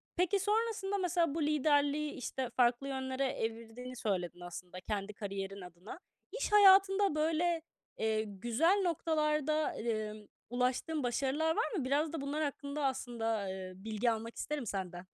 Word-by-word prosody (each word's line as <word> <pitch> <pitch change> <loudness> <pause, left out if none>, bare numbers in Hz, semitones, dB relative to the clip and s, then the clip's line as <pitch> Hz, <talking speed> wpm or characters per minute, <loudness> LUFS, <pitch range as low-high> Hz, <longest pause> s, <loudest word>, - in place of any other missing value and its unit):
Peki, 365 +3 +2
sonrasında, 420 -1 0
mesela, 345 -5 +1
bu 330 - -1
liderliği, 295 0 +2
işte, 255 0 -4
farklı 245 +2 +2
yönlere 265 0 -2
evirdiğini 230 +2 -5
söyledin, 185 -7 -2
aslında 175 +1 -8
kendi 205 +1 -3
kariyerin 195 -1 -5
adına. 180 - -10 0.3
İş - - -2
hayatında 390 -2 +6
böyle, 325 +2 +1 0.4
eee, 220 0 +1
güzel 240 - +1
noktalarda, 305 -2 +1
emm, 215 -2 -3 0.2
ulaştığın 255 +5 0
başarılar 275 +6 +1
var 450 - 0
mı? 280 - -1
Biraz 295 +4 +1
da 320 - -3
bunlar 290 +3 -1
hakkında 285 0 -3
aslında, 225 -6 -1
eee, 190 -1 -6
bilgi 215 +4 0
almak 225 +1 -4
isterim 295 -3 -3
senden. 185 -3 -4
265 Hz, 140 wpm, -33 LUFS, 220-315 Hz, 0.4 s, hayatında